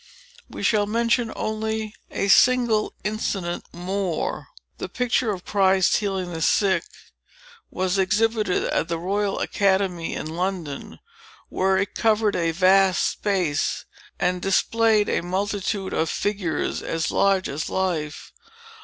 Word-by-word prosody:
We - - -7
shall 205 -2 +2
mention 230 +1 +1
only 220 0 -3 0.2
a 195 - -2
single 235 0 +4
incident 195 -5 -2
more. 180 0 -3 0.3
The - - -5
picture 250 -1 0
of 185 -4 -4
Christ 190 -2 +3
Healing 190 -4 -2
the 160 - -5
Sick 190 0 +2 0.9
was 185 +1 -1
exhibited 215 0 +1
at - - 0
the 170 -1 -2
Royal 195 +4 -1
Academy 190 -4 0
in - - -4
London, 175 -5 -4 0.5
where 190 0 +1
it 195 +1 -1
covered 215 -2 +2
a 165 -2 +1
vast 185 +2 +4
space, 180 -8 -1 0.3
and 180 0 0
displayed 215 +2 +2
a - - 0
multitude 195 +2 -2
of 160 - 0
figures 200 -6 -2
as 165 -1 -2
large 195 -1 +2
as 145 +3 -4
life. 165 -5 -2
195 Hz, 125 wpm, -23 LUFS, 180-210 Hz, 0.9 s, single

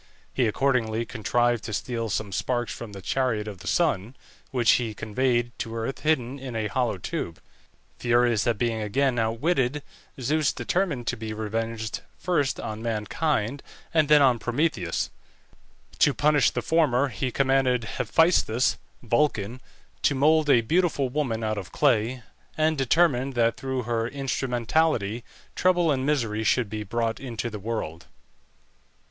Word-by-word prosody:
He 125 -3 +2
accordingly 115 -2 +1
contrived 120 +1 0
to 110 - -5
steal 115 +1 -2
some 105 -1 -2
sparks 120 +4 -1
from 115 -3 -8
the 100 -2 -10
chariot 115 -4 0
of 100 -4 -7
the 95 - -10
sun, 125 - +1 0.3
which 120 -3 +3
he 115 -4 +1
conveyed 120 +2 0
to 115 0 -4
earth 115 +4 -3
hidden 140 -4 0
in 130 -3 -7
a 110 -1 -1
hollow 115 0 0
tube. 85 -2 -4 0.6
Furious 120 -2 +2
at 115 -3 +1
being 115 -1 -1
again 120 +4 +1
outwitted, 130 +4 0 0.4
Zeus 150 +4 +1
determined 170 -10 -1
to 125 - -1
be 110 -1 -5
revenged 110 0 -3 0.2
first 150 -7 0
on 110 0 -5
mankind, 115 +3 -1 0.3
and 155 -3 +3
then 150 -1 +7
on 125 -3 +4
Prometheus. 120 - -1 0.9
To 145 - +4
punish 145 0 +4
the - - -3
former 145 -5 +2
he 130 +2 -2
commanded 135 -2 +2 0.2
Hephæstus 130 -8 +3 0.3
(Vulcan) 120 -2 0 0.4
to 145 - +2
mould 155 +2 +3
a 120 -4 +6
beautiful 155 0 +1
woman 125 -5 -1
out 110 -1 -1
of 95 - -9
clay, 125 -3 +1 0.3
and 155 0 +2
determined 135 -1 +2
that 115 -1 +2
through 130 -1 -3
her 115 0 -1
instrumentality 125 -3 0 0.3
trouble 175 -3 +3
and 135 -1 0
misery 115 -7 0
should 115 -1 +1
be 110 -1 -3
brought 115 +2 -2
into 120 -3 -4
the 105 - -6
world. 95 -6 -4
120 Hz, 145 wpm, -26 LUFS, 110-140 Hz, 0.9 s, then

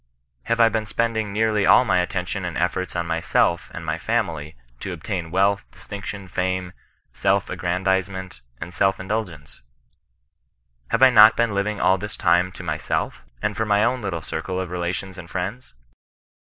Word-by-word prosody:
Have 115 - 0
I 115 - +7
been 110 -1 -1
spending 110 0 -1
nearly 110 0 +1
all 125 - +7
my 95 - +3
attention 90 +1 -2
and 90 -2 -4
efforts 90 +1 -1
on 85 -1 -1
mysdf 85 +1 +1
and 85 - -8
my 80 - -1
own 80 - -4
family, 85 -9 -2 0.2
to 95 - -5
obtain 85 0 -4
wealth, 100 +3 +2
distinction, 100 -1 -8
fame, 90 0 -2 0.4
self 95 +9 +1
aggrandizement, 95 -3 -1 0.2
and 85 +2 -7
self 95 +2 +2
indul 105 +2 -2
gence? 75 -4 -14 1.3
Have 115 - +2
I 130 - +8
not 110 -2 +8
been 115 -3 +2
living 100 +1 -1
all 95 0 +3
this 105 +2 -6
time 90 0 +3
to - - -9
myself, - - -2 0.2
and 105 - 0
for 110 +1 -1
my 105 0 +3
own 125 +2 +1
littl^ 90 -6 -3
circle 95 +4 -4
of 95 -2 -4
relations 90 +2 -3
and 85 -2 -10
friends? 95 - -5
95 Hz, 170 wpm, -23 LUFS, 90-105 Hz, 1.3 s, I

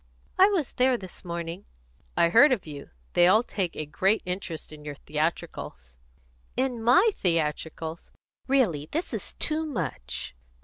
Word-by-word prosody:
"I 380 - +9
was 370 -10 0
there 255 0 +3
this 185 -5 -10
morning 170 +1 -5 0.3
" - - -34
"I 170 - +5
heard 250 - +7
of 240 -7 0
you. 145 -3 -8 0.2
They 175 - +6
all 215 +5 +5
take 190 -8 -2
a 155 - -3
great 190 +8 +1
interest 180 -4 -4
in 150 -1 -11
your 145 -1 -6
theatricals." 140 - -4 0.6
"In 255 -3 0
my 265 - +5
theatricals? 160 -1 -2 0.4
Really 200 - +2
this 325 +4 -2
is - - -4
too 315 0 -1
much! 180 - -4
175 Hz, 150 wpm, -27 LUFS, 155-250 Hz, 0.6 s, I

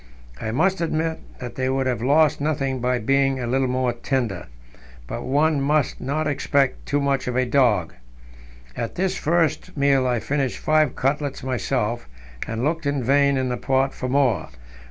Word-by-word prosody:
I 110 - -3
must 180 - +1
admit 160 0 -1 0.2
that 125 -2 -7
they 130 0 -1
would 135 0 0
have 125 -4 -1
lost 145 +3 +3
nothing 135 -3 -1
by 125 +1 +1
being 135 +3 +1
a 125 - -2
little 130 +2 +1
more 125 -1 0
tender, 120 -6 -2 0.6
but 115 - -5
one 145 +3 +1
must 145 0 +1
not 150 +4 -1
expect 140 -2 0
too 145 - +1
much 140 -2 0
of 125 - -2
a 130 0 +2
dog. 120 -9 +2 0.8
At 115 - -4
this 190 +1 0
first 165 -1 0
meal 140 -2 +3
I 120 -2 +1
finished 135 +2 -1
five 155 -3 +2
cutlets 140 0 -1
myself, 120 - -1 0.4
and 115 +1 -3
looked 160 +1 -1
in 140 -2 0
vain 140 +2 +3
in 130 -1 0
the 125 - -2
pot 135 +1 +1
for 130 - -4
more. 125 - +1
135 Hz, 175 wpm, -23 LUFS, 125-145 Hz, 0.8 s, lost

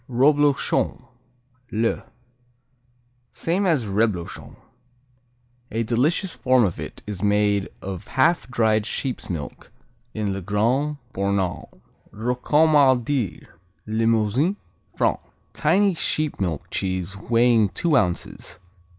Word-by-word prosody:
Roblochon, 140 +1 +2 0.7
le 115 +1 0 1.3
Same 185 +4 -1
as 150 -9 +2
Reblochon. 100 -3 -2 1.1
A 115 +1 -1
delicious 145 - 0
form 130 -1 +3
of 95 -5 -1
it - - -8
is 105 -3 -6
made 105 -1 +2
of 95 0 -6
half 165 +6 +2
dried 110 -3 +1
sheep's 130 0 -4
milk 80 -5 -6 0.4
in 105 -3 -1
Le 95 - -4
Grand 120 - 0 0.2
Bornand. 100 -2 -1 0.4
Rocamadur 130 - +2 0.4
Limousin, 115 - +1 0.4
France - - +1 0.3
Tiny 200 -1 +3
sheep 155 -2 -1
milk 85 -6 -3
cheese 95 0 -2
weighing 115 0 +3
two 165 - 0
ounces. 90 -10 -1
115 Hz, 100 wpm, -23 LUFS, 100-140 Hz, 1.3 s, form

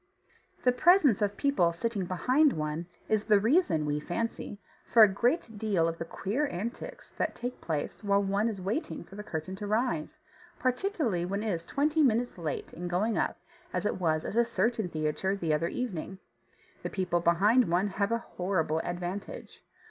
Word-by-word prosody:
The 250 - +5
presence 285 - +5
of 205 -1 0
people 280 -12 +2
sitting 205 +1 -2
behind 255 - +3
one 155 +2 -3 0.2
is 215 -1 +1
the 210 -2 +5
reason 225 - +2
(we 150 0 0
fancy) 205 +4 -4 0.3
for 230 - +9
a - - +9
great 225 - 0
deal 195 -7 +2
of 165 0 -3
the 165 - -3
queer 215 - -1
antics 245 - -6
that - - -1
take 245 +1 -5
place 155 +5 -3
while 200 0 +3
one 200 +3 +1
is 205 -4 -5
waiting 210 - -3
for 175 - -17
the 210 - -6
curtain 170 -2 -5
to 205 +1 -5
rise, 215 -7 -1 0.4
particularly 255 - 0
when 200 +4 -2
it 220 - 0
is 165 0 -5
twenty 300 +3 +1
minutes 245 -6 +2
late 155 -4 -4
in 175 +1 -5
going 200 +6 0
up - - 0 0.4
as - - -1
it 205 - -1
was 155 -2 +1
at - - -4
a 235 - +5
certain 225 -2 0
theatre 155 +5 -1
the 165 -5 0
other 160 +3 +1
evening. 190 -5 -4 0.7
People 180 -3 0
behind 195 +8 +4
one 180 +4 +2
have 200 +2 -1
a 230 - +3
horrible 180 -7 -1
advantage. 175 +3 -5
200 Hz, 180 wpm, -29 LUFS, 175-235 Hz, 0.7 s, for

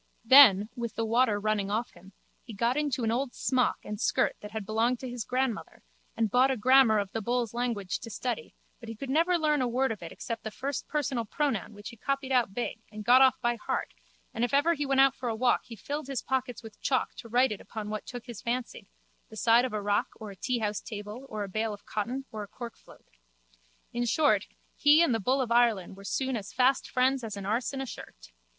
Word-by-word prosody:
Then, 225 -6 +8
with 235 -2 -5
the 225 - -1
water 225 -2 +2
running 205 -1 0
off 220 +3 -1
him, 185 +2 -17 0.3
he 230 - -11
got 235 +5 +1
into 285 -4 -1
an 225 - +1
old 250 +2 -2
smock 255 -2 +1
and 210 +1 -6
skirt - - +1
that 210 - -8
had 215 -1 -5
belonged 230 +4 +1
to 260 - -5
his 245 -2 -4
grandmother 255 -2 -2 0.3
and 225 -3 +1
bought 255 +2 +4
a 265 - 0
grammar 255 -1 +5
of 200 -2 -2
the 225 - -3
bulls' 240 0 -1
language 225 -7 -2
to 230 - -9
study 250 - -4 0.2
but 230 - -10
he 225 - -6
could 265 +4 -6
never 340 +4 +3
learn 300 -3 +1
a 250 - +1
word 255 +2 +1
of 215 - -6
it 170 - -8
except 230 -1 -5
the 220 - -3
first 270 +5 -4
personal 275 -5 -1
pronoun 225 - -2
which 205 0 -8
he 235 - -13
copied 275 +2 -2
out 240 -6 +2
big 240 -2 -3
and 210 0 -8
got 250 +2 +7
off 265 -1 +5
by 240 -1 +1
heart - - -3 0.4
and 230 - -2
if 245 +3 +1
ever 305 +4 +4
he 290 -3 -3
went 270 0 +2
out 270 0 +6
for 245 - -4
a 225 - -2
walk 245 +2 +2
he 235 - -9
filled 285 +7 -5
his 275 -3 -3
pockets 255 -2 -2
with 220 -2 -12
chalk 260 -2 0
to 230 - -11
write 250 +2 +3
it 210 - -5
upon 215 -2 -7
what 215 - -5
took 245 -2 -7
his 240 -4 -8
fancy, 235 -3 -4 0.4
the 220 - -11
side 235 +3 +4
of 255 - -4
a 210 -1 -3
rock 205 0 +1
or 215 -2 -8
a - - -11
teahouse 215 -1 -2
table 210 +5 -8
or 215 -1 -4
a - - -5
bale 215 +2 -2
of 205 - -22
cotton 245 +6 -3
or 215 - -5
a 205 - -6
corkfloat. 235 +3 -11 0.9
In 240 0 -1
short, 230 -5 +2 0.3
he 300 +3 +6
and 280 - +2
the 225 - 0
bull 260 +6 +1
of 240 -3 -3
Ireland 230 -6 +2
were 195 - -13
soon 265 +4 -1
as 205 -3 -5
fast 255 +1 +2
friends 260 0 +1
as 215 -2 -5
an 195 - -6
arse 225 +5 0
and 270 -1 -4
a - - -5
shirt. - - -11
235 Hz, 240 wpm, -29 LUFS, 215-260 Hz, 0.9 s, Then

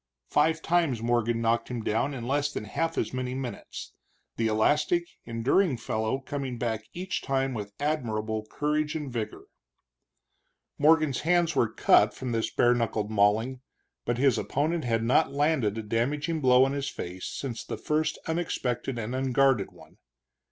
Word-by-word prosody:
Five 160 +2 +2
times 160 -9 +1
Morgan 120 -1 +1
knocked 115 0 +1
him 120 -3 -4
down 115 +7 0
in 120 -2 -5
less 145 +2 +1
than - - -4
half 165 +9 -2
as - - -1
many 130 0 -3
minutes, 130 -2 -6 0.4
the 115 - 0
elastic, 150 +10 +2 0.2
enduring 125 +7 +1
fellow 110 +2 -1
coming 135 -2 -4
back 110 -2 -2
each 180 +1 -3
time 135 -1 0
with 105 -3 -5
admirable 110 -7 -2
courage 150 +1 -1
and 145 -5 -4
vigor. 110 -3 -4 1.4
Morgan's 155 -2 +4
hands 170 0 +2
were 110 - +2
cut 105 -1 +4
from 130 -2 -4
this 115 -1 0
bare 120 0 +4
knuckled 110 -3 -1
mauling, 110 +5 +2 0.4
but 120 0 -1
his 135 -2 +3
opponent 155 +3 -1
had 115 -1 +1
not 130 +3 +3
landed 140 -7 +1
a 110 - -3
damaging 145 +9 -1
blow 130 0 +6
on 135 - -1
his 140 -1 -2
face 90 -5 -6
since 125 -4 -5
the - - -5
first 155 +1 0
unexpected 135 -7 -2
and 115 +2 -4
unguarded 130 -4 +2
one. - - -18
130 Hz, 160 wpm, -28 LUFS, 115-150 Hz, 1.4 s, blow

